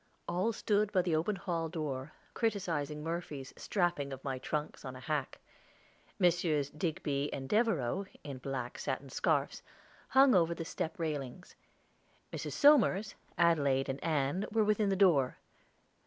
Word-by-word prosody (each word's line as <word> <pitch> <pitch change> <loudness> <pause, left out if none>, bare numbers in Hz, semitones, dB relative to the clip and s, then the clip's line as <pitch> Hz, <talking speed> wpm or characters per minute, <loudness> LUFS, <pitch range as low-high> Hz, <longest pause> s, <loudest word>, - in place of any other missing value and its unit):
All 180 +6 +1
stood 210 -1 +1
by 185 -3 +3
the 170 -3 +1
open 170 +7 0
hall 170 -3 -2
door, 150 -3 -4 0.2
criticising 165 - -1
Murphy's 160 -5 -5
strapping 175 -8 -1
of 135 0 -7
my 135 -2 -3
trunks 150 +3 -3
on 130 -2 -6
a - - -8
hack. 140 +1 -3 0.8
Messrs. 165 -6 +2
Digby 150 -3 -2
and 135 -1 -5
Devereaux, 195 - +1 0.2
in 140 -3 -6
black 130 -2 -4
satin 135 +1 -3
scarfs, 145 -3 0 0.5
hung 270 0 +6
over 170 -3 +3
the 165 - -5
step 175 -1 -4
railings; 155 0 -4 0.8
Mrs. - - -4
Somers, 225 -9 +5 0.2
Adelaide, 140 -6 +3
and 135 +1 -4
Ann 155 +4 0
were 220 0 +3
within 210 -1 +2
the 195 - +2
door. 165 -10 +4
160 Hz, 140 wpm, -33 LUFS, 140-190 Hz, 0.8 s, hung